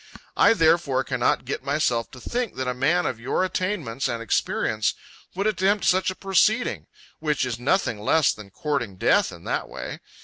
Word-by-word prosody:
I 230 - +5
therefore 160 -6 +3
cannot 125 -1 0
get 130 - -4
myself 140 -5 0
to 130 - -12
think 240 - -3
that 130 0 -3
a 125 - 0
man 150 +7 +1
of 115 - -2
your 120 +9 0
attainments 185 - -2
and 115 - -3
experience 110 -1 0 0.4
would 195 +2 -1
attempt 200 0 +1
such 185 +1 +3
a 185 - -4
proceeding, 205 +5 +1 0.3
which 150 -4 0
is 120 -2 -4
nothing 125 - +1
less 145 +7 +3
than 105 -2 -12
courting 120 -3 -3
death - - +3
in - - -12
that - - -2
way. - - -7
145 Hz, 175 wpm, -24 LUFS, 120-185 Hz, 0.4 s, I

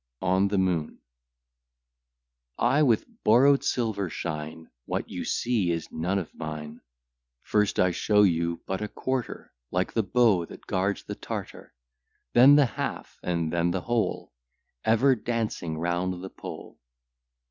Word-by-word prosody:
ON 95 +2 +3
THE 100 0 -1
MOON 90 -5 0 1.6
I 145 - +3
with 120 -7 +3 0.2
borrow'd 135 +6 +5
silver 110 -6 -1
shine 80 -1 -6
What - - -3
you - - -4
see 115 -7 0
is 85 -1 -3
none 90 +5 -1
of 90 -5 -4
mine. 75 -1 -7 0.6
First 105 -1 +1
I 90 - +4
show 105 +4 +3
you 85 -2 +1
but 95 +1 -3
a 105 - -2
quarter, 130 +3 -4 0.2
Like 90 +1 -1
the 115 - +2
bow 105 -3 +3
that - - -13
guards 95 +2 -1
the - - -6
Tartar: - - -7 0.6
Then 130 +4 +8
the 145 -1 +6
half, 120 - -5
and 85 -2 -1
then 85 0 +2
the 90 +1 -1
whole, 115 - -2 0.5
Ever 125 +5 +4
dancing 110 -9 -3
round 90 +2 -2
the 95 - -7
pole. - - -9
95 Hz, 140 wpm, -27 LUFS, 85-115 Hz, 1.6 s, Then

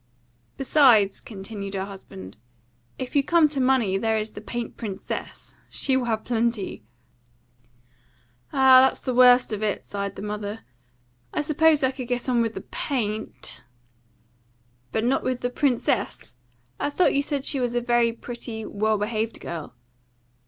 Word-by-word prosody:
"Besides," 250 -8 +4
continued 200 -1 -7
her 190 0 -2
husband, 100 - -10 0.6
"if 255 +2 -6
you 285 - +6
come 335 +1 +4
to 280 -2 -2
money, 250 -7 +2
there 220 0 +1
is 215 0 -3
the 205 - -9
paint 235 +1 -5
princess. 205 -3 -6
She 265 - 0
will 260 -2 +1
have 220 -2 -1
plenty." 230 - -1 1.7
"Ah, 265 -1 +7
that's 265 - +3
the 255 - -3
worst 250 -1 +6
of 210 - -3
it," 215 -1 -1
sighed 200 -1 -4
the 195 - -7
mother. 210 +1 -4 0.7
"I - - -1
suppose 305 0 +3
I 260 - +3
could 260 -2 -7
get 245 +1 -2
on 245 -2 +2
with 225 -1 -1
the - - -5
paint 215 - -4 0.7
" 120 +1 -39
"But 220 - 0
not 260 +3 +2
with 255 -1 -2
the 245 - -1
princess? 255 - -1 0.5
I - - 0
thought 350 +5 +2
you 280 - +3
said 285 -1 -3
she 275 - 0
was 245 -1 -1
a - - +3
very 240 -1 +2
pretty, 230 -1 -6
well 215 +1 0
behaved 220 +2 -2
girl?" 160 -6 -7
230 Hz, 160 wpm, -25 LUFS, 205-260 Hz, 1.7 s, Ah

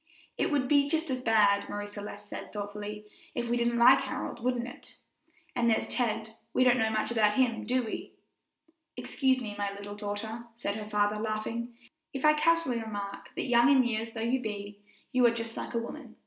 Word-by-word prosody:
"It - - 0
would 280 -4 +1
be 285 0 +4
just 320 -1 +1
as 255 -1 -1
bad," 210 -4 +3
Marie 205 0 -3
Celeste 205 0 -8
said - - -7
thoughtfully, 210 0 -6 0.3
"if 240 0 -2
we 240 - +2
didn't 235 0 +1
like 255 +3 +7
Harold, 265 -2 -4
wouldn't 245 -1 0
it? 250 - -12 0.6
And 240 -2 +3
there's 220 - +2
Ted; 220 -2 -1 0.2
we 255 - +4
don't 250 0 +5
know 220 0 +2
much 220 +2 0
about 210 -3 +3
him, 235 -4 +1
do 250 +3 +1
we?" 220 - -6 0.8
"Excuse 260 -2 +1
me, 210 -2 -5
my 200 -1 -1
little 205 0 -7
daughter," 210 +3 -5
said 205 -4 -3
her 215 -1 -6
father, 210 0 +1
laughing, 225 +2 -3 0.4
"if 270 +1 -2
I 305 - +7
casually 305 -6 +2
remark 205 -2 -6
that - - -1
young 240 +1 +5
in 270 -3 +6
years 230 -1 -1
though 225 - -4
you 240 +3 +1
be, 205 -2 -5 0.3
you 255 0 +3
are - - +4
just 230 -1 -4
like - - -5
a - - +2
woman. 235 0 -8
230 Hz, 200 wpm, -30 LUFS, 210-250 Hz, 0.8 s, like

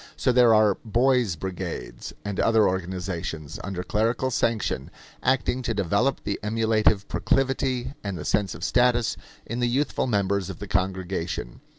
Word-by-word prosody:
So 130 - +2
there 120 -2 +6
are 105 -2 +4
"boys' 120 -3 +2
brigades," 90 -9 -5
and 100 -1 -3
other 110 -2 +4
organizations, 85 -5 -4
under 95 -2 -4
clerical 115 +6 0
sanction, 110 - 0 0.3
acting 130 -1 +1
to 120 -3 -2
develop 100 +8 +1
the 100 - -2
emulative 110 -1 +2
proclivity 130 +5 0
and 100 -3 -3
the 75 - -6
sense 100 -2 0
of 85 - -9
status 120 +1 +2 0.3
in 115 +2 -4
the 120 -1 +2
youthful 135 +2 0
members 100 -4 0
of 95 - -6
the 105 - -7
congregation. 95 -8 -2
105 Hz, 150 wpm, -25 LUFS, 95-120 Hz, 0.3 s, there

